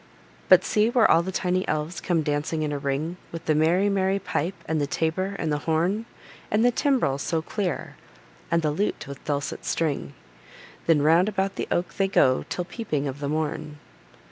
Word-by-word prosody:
But, - - +7
see 215 +1 +2
where 240 -2 +4
all 165 - +6
the 185 +2 -4
tiny 185 0 0
elves 155 +3 -2
come 170 -3 +1
dancing 150 +2 -1
in 150 - -1
a 145 - -2
ring, 140 +5 -2
With 165 0 -7
the 155 - +3
merry, 165 +6 +3
merry 195 -1 +1
pipe, 185 -2 -2
and 160 -1 0
the 145 - 0
tabor, 185 +7 -1
and 160 - -2
the 145 - 0
horn, 185 +8 +1 0.4
And 215 +3 +2
the 245 - +5
timbrel 245 - +1
so 160 +2 -1
clear, 190 -2 -3 0.5
and 170 -1 +1
the 150 - +2
lute 200 +8 -1
with 140 -1 -9
dulcet 145 -1 -2
string; 155 -4 -2 0.7
Then 155 -3 +4
round 165 +6 +5
about 195 -1 -1
the - - -3
oak 175 - -1
they 195 - +1
go 130 -9 +3
till 180 - -2
peeping 175 - -3
of 135 +1 -5
the 140 -1 -3
morn. 155 0 -3
165 Hz, 195 wpm, -25 LUFS, 150-190 Hz, 0.7 s, But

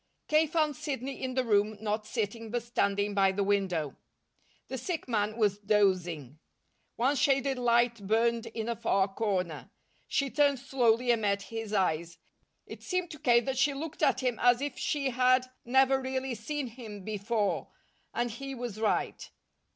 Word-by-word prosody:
K. 310 +1 +4
found 310 -2 +1
Sidney 270 0 -4
in 255 -1 -3
the 260 - +2
room, 210 -2 +2
not 215 0 -2
sitting, 225 0 -3
but 240 +1 -2
standing 205 -3 0
by 195 -1 +4
the 200 +1 -1
window. 190 -7 0 0.7
The 260 - -4
sick 330 +4 -4
man 215 -2 0
was 205 -3 +2
dozing. 180 - +1 0.6
One 260 +5 +2
shaded 270 -1 +2
light 235 -3 +2
burned 230 +2 +2
in 225 -1 -5
a 235 - -1
far 195 -3 +1
corner. 190 -5 -2 0.4
She 275 -2 0
turned 285 -2 +3
slowly 245 -2 +2
and 230 -2 +1
met 200 -1 0
his 225 -2 -4
eyes. 170 -4 0 0.5
It - - -10
seemed 365 -2 -2
to 300 - -9
K. 240 -2 +4
that 260 +1 -2
she 285 0 +3
looked 315 +2 -6
at 255 - +3
him 250 -3 -1
as 245 0 +4
if 285 +1 -3
she 275 -3 -1
had 255 +1 +3 0.2
never 265 +2 +4
really 260 0 -2
seen 275 +6 -4
him 225 -5 -9
before, 210 +1 -1 0.4
and 240 0 -1
he 275 +4 -6
was 240 -4 -5
right. 215 - -1
235 Hz, 165 wpm, -30 LUFS, 205-265 Hz, 0.7 s, K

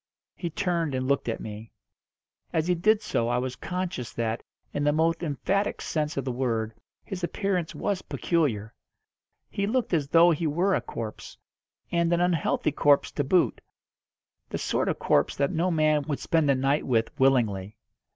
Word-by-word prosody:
He 170 - -4
turned 165 -4 -1
and 130 0 -1
looked 140 -3 +1
at 115 - -2
me. 110 +1 -8 0.8
As 160 -1 +1
he 180 - +2
did 210 +5 +2
so 115 - 0
I 120 +1 +1
was 125 0 -2
conscious 180 -9 -4
that, 115 0 -2 0.3
in 145 - -1
the 145 - +4
most 165 +2 +1
emphatic 185 +6 -1
sense 150 -2 -2
of 135 - -1
the 130 - -1
word, 115 -3 -1 0.3
his 185 -2 -6
appearance 180 -1 -1
was 200 -3 -1
peculiar. 115 - -1 0.8
He 200 0 -1
looked 240 -2 0
as 150 -4 +1
though 170 +3 +6
he 160 0 0
were 175 +6 +1
a - - +1
corpse, 110 -2 -7 0.5
and 170 -1 +2
an 170 - +3
unhealthy 175 -3 +1
corpse 145 -1 +3
to 145 - -1
boot 175 +6 +2 0.9
the - - -3
sort - - 0
of - - -1
corpse - - +2
that 140 0 +1
no 170 +3 +1
man 155 -3 +3
would 145 -3 -1
spend 160 -4 +1
a 140 - +5
night 135 +3 +1
with 115 -3 +1
willingly. 110 -7 +2
150 Hz, 175 wpm, -27 LUFS, 130-175 Hz, 0.9 s, though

